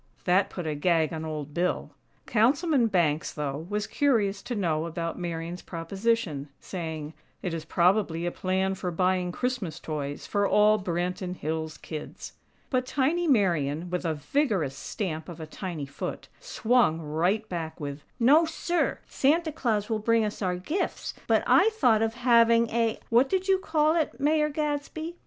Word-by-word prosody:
That 190 +2 +3
put 180 - -6
a 155 - -1
gag 160 +1 +1
on 160 0 -4
Old 150 -2 -5
Bill. 175 +3 -1 0.3
Councilman 265 +3 +3
Banks, 165 -7 +1
though, 150 +2 -4
was 210 0 -1
curious 210 -9 +1
to 240 +3 -4
know 165 -5 0
about 165 +1 -4
Marian's 170 0 -4
proposition, 175 -3 -2
saying: 160 -4 -5 0.3
"It 180 - -2
is 160 -1 -4
probably 175 -1 +2
a 175 - 0
plan 190 +1 0
for 185 -1 -3
buying 180 +1 +1
Christmas 205 - -3
toys 145 -3 -4
for 205 -1 +1
all 210 +1 +5
Branton 180 0 -2
Hills 160 -1 -3
kids." 155 -2 -8 0.4
But 255 -1 +1
tiny 315 +7 +1
Marian, 175 - +1
with 180 0 -1
a 160 -2 0
vigorous 165 - 0
stamp 160 +1 -4
of 170 -1 -8
a 160 - -5
tiny 160 -2 -5
foot, 140 - -6
swung 230 -9 +2
right 175 +8 0
back 165 -4 -5
with: 145 -1 -6 0.2
"NO, 290 +8 +6
SIR!! 340 +1 -1
Santa 315 +4 +1
Claus 220 -8 0
will 220 -2 -1
bring 230 +1 +2
us 210 - -5
our 180 -2 0
gifts! 310 - -3
But - - +3
I 410 - +5
thought 245 - +3
of 225 0 0
having 235 -1 +4
a 230 -1 +1
what 245 +3 +4
did 380 0 0
you 385 -1 +4
call 315 -3 +2
it, 315 -4 -1
Mayor 300 +1 +2
Gadsby?" 300 +3 -3
190 Hz, 165 wpm, -27 LUFS, 165-245 Hz, 0.4 s, NO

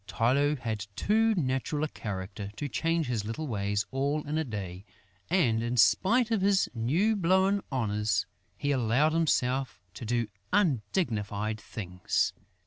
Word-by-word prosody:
Tylô 135 +8 +2
had 110 -4 -4
too 220 +1 +2
natural 145 -1 -1
a - - +1
character 100 -4 -6
to 145 - -3
change 165 +3 0
his 120 -5 -1
little 115 +9 -4
ways 100 -4 -1
all 140 +3 0
in 150 - -2
a - - +1
day; 95 - -6 0.5
and, 125 -11 +2
in 120 +2 -2
spite 210 - +4
of 220 -4 +2
his 195 0 +3
new 155 - +1
blown 190 +2 +3
honours, 105 -4 0 0.3
he 145 - -1
allowed 135 +4 +2
himself 135 -5 +1
to - - -8
do 120 +1 0 0.3
undignified 110 - 0
things. 90 -6 -1
130 Hz, 140 wpm, -29 LUFS, 110-165 Hz, 0.5 s, spite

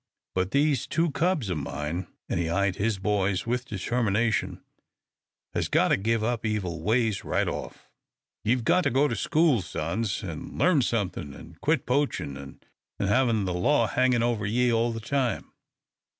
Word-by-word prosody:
But 95 0 0
these 140 +1 +2
two 165 -1 +1
cubs 155 - 0
o' - - 0
mine," 75 +5 -4 0.2
and - - -1
he 85 -1 -1
eyed 95 +2 +1
his 105 0 0
boys 95 -2 0
with 125 +2 -1
determination, 115 +1 0 0.9
"has - - 0
got - - +3
to - - +5
give 110 +3 0
up 120 0 -1
evil 95 -7 -2
ways 110 +1 +1
right - - 0
off. - - -6 0.6
Ye've 120 +2 +1
got 180 - +4
to - - +4
go 135 +3 +3
to - - -2
school, 155 - +2
sons, 95 +7 -3
an' 85 -5 -7
learn 170 -6 +4
somethin', 95 - -2
an' 85 +2 -13
quit 155 -3 +1
poachin', 125 - 0
an' 70 0 -10 0.4
hevin' 110 +1 +2
the 90 - -1
law 115 +8 +3
hangin' 125 0 +2
over 115 -4 0
ye 120 +3 +2
all 115 +1 +2
the 115 0 -5
time." 125 0 -1
110 Hz, 165 wpm, -27 LUFS, 95-125 Hz, 0.9 s, to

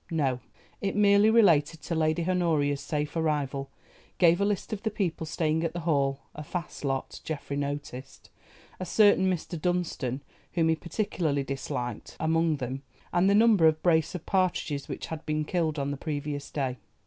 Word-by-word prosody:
No, 140 -6 0 0.4
it 195 -1 -1
merely 205 +1 +5
related 165 -9 +4
to - - -3
Lady 160 +1 +1
Honoria's 155 -6 +1
safe 150 +1 -3
arrival, 145 -4 -1 0.5
gave 175 +1 +4
a - - +3
list 205 +1 -2
of 205 - -4
the 220 - 0
people 185 -7 -2
staying 160 +1 0
at 165 - -1
the 175 - -4
Hall—a 140 -2 -1
fast 175 +2 -6
lot, 135 -2 -3
Geoffrey 145 -2 -4
noticed, 140 -2 -5 0.5
a 185 - -3
certain 205 -2 +4
Mr. 170 -2 -4
Dunstan, 160 -7 -1 0.3
whom 165 -2 +2
he 160 - +3
particularly 165 -4 -1
disliked, 135 -3 -5
among 165 0 +2
them—and 135 +7 -2
the 200 - +4
number 215 -6 +6
of 155 0 +1
brace 160 -1 +2
of 175 - -6
partridges 180 -6 0
which - - -5
had 160 -1 -6
been 155 0 0
killed 160 -2 -1
on 140 0 -1
the 140 - -4
previous 145 -1 -4
day. 130 -3 -2
160 Hz, 165 wpm, -28 LUFS, 145-175 Hz, 0.5 s, number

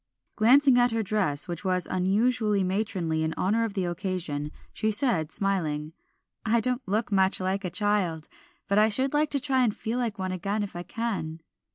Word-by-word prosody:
Glancing 255 +3 +5
at 245 0 +4
her 225 -1 0
dress, 185 -9 0
which 175 0 -5
was 185 -2 +1
unusually 210 +2 +1
matronly 185 -4 -1
in 160 0 -1
honor 215 +5 +1
of 220 -3 -3
the 190 -2 0
occasion, 175 -5 -3 0.2
she 220 - 0
said 210 - 0
smiling 160 -6 -1 0.5
"I 230 +1 +2
don't 250 +2 -1
look 210 +3 -1
much 190 -1 +2
like 190 +2 -1
a 180 - -2
child, 180 -4 0 0.4
but 200 +1 +3
I 215 +1 +5
should 260 +6 +1
like 300 0 +2
to 280 - +2
try 260 -1 +1
and 220 -4 +1
feel 230 +3 -2
like 230 -4 -2
one 185 -1 -3
again 200 +3 -2
if 200 - -7
I 175 - -4
can." 190 -6 -4
200 Hz, 190 wpm, -27 LUFS, 180-225 Hz, 0.5 s, Glancing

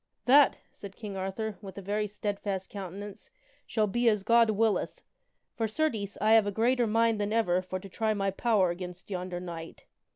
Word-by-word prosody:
" - - -52
That," 280 +2 +6
said 195 -1 -10
King 210 -3 -7
Arthur, 195 +3 -4
with 195 -2 -10
a - - -5
very 210 +2 -1
steadfast 200 -2 -4
countenance, 200 +1 -8 0.2
" - - -35
shall 215 -2 +1
be 235 +4 +2
as 210 -3 0
God 230 +1 +5
willeth. 215 0 0 0.5
For, 225 - -1
certes, 215 -5 -1
I 215 +2 +3
have 220 -2 +6
a - - 0
greater 235 +3 +2
mind 225 0 +2
than 205 0 -1
ever 185 -5 +2
for 185 0 -5
to 195 - -10
try 215 +3 -1
my 195 -1 0
power 195 -3 +2
against 180 +2 -8
yonder 180 -1 -3
knight. 170 -2 -8
205 Hz, 195 wpm, -29 LUFS, 190-225 Hz, 0.5 s, That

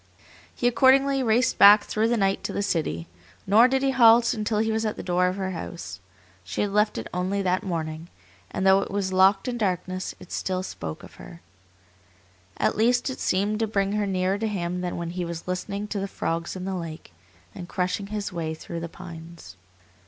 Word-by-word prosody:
He 245 - +1
accordingly 270 +3 +4
raced 245 +1 +2
back 205 +1 +9
through 215 +1 0
the 240 0 +1
night 195 -2 +1
to - - -2
the 200 - -1
city; 85 - -2 0.4
nor 215 +5 +6
did 265 +1 0
he 270 - +2
halt 230 -2 +6
until 215 -1 -2
he 220 +1 +1
was 220 0 0
at 215 -1 -1
the - - -7
door 180 0 +2
of 180 - -1
her 190 -1 -3
house. 165 - -7 0.4
She 95 +4 -3
had 205 - -1
left 210 +1 +2
it - - -4
only 185 +2 -1
that 185 0 +1
morning, 160 -3 -4 0.4
and 190 - -3
though 190 0 +6
it - - -5
was 195 -1 -2
locked 195 +4 +4
in 240 -1 -3
darkness, 185 -2 -2
it 180 - -14
still 185 -1 -2
spoke 80 - -7
of - - -14
her. 85 - -12 1.2
At - - +1
least 245 +4 +2
it 260 - -8
seemed 205 +3 0
to 225 - +1
bring 200 -2 0
her 210 -1 0
nearer 190 +1 0
to 225 - -1
him 180 -3 -3
than 180 -1 -3
when 170 -1 -4
he 180 0 -3
was 170 0 -6
listening 200 +3 -3
to 205 - -2
the 195 - -2
frogs 165 -2 -3
in 185 0 -6
the 195 - -3
lake, 165 - -7 0.4
and 175 - -9
crushing 185 +2 -2
his 210 -2 -4
way 160 -2 -3
through 170 +1 -7
the 170 0 -6
pines. 170 - -11
195 Hz, 210 wpm, -25 LUFS, 175-215 Hz, 1.2 s, back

